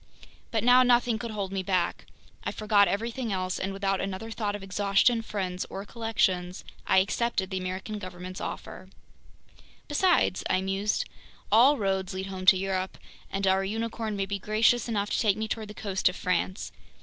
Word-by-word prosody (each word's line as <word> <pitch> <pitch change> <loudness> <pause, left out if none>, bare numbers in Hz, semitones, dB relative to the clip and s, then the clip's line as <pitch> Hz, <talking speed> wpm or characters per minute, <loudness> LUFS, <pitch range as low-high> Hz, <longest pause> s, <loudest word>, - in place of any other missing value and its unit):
But 220 -2 0
now 250 +1 +7
nothing 245 -2 +3
could 235 -1 -4
hold 200 -3 -4
me 195 -1 -1
back. 185 -2 -1 0.4
I - - -2
forgot 210 -2 +3
everything 230 +2 -2
else, 185 -1 -2
and 190 - -2
without 195 -1 -1
another 195 +3 -4
thought 210 -2 -2
of 205 - -7
exhaustion, 200 +4 +2
friends, 185 -4 -3
or 195 - -6
collections, 190 -6 -1 0.2
I 190 - +4
accepted 200 0 +1
the 190 - -1
American 185 +3 -4
government's 185 -1 -7
offer. - - -7 1.0
"Besides," 330 - +2
I 185 - +3
mused, 195 +2 -1 0.5
"all 255 +7 +6
roads 190 -2 -1
lead 190 0 -3
home 190 -1 -6
to 190 - +8
Europe, 190 0 -2 0.3
and 195 0 -1
our 190 0 +3
unicorn 225 +1 -3
may 195 -1 -1
be 200 +1 -3
gracious 220 +4 +2
enough 205 -2 -1
to - - +1
take 210 -4 +2
me 220 0 -2
toward 220 -1 -4
the 210 - -10
coast 195 -4 +1
of 180 - -7
France! 185 +2 -1
200 Hz, 175 wpm, -28 LUFS, 190-220 Hz, 1.0 s, to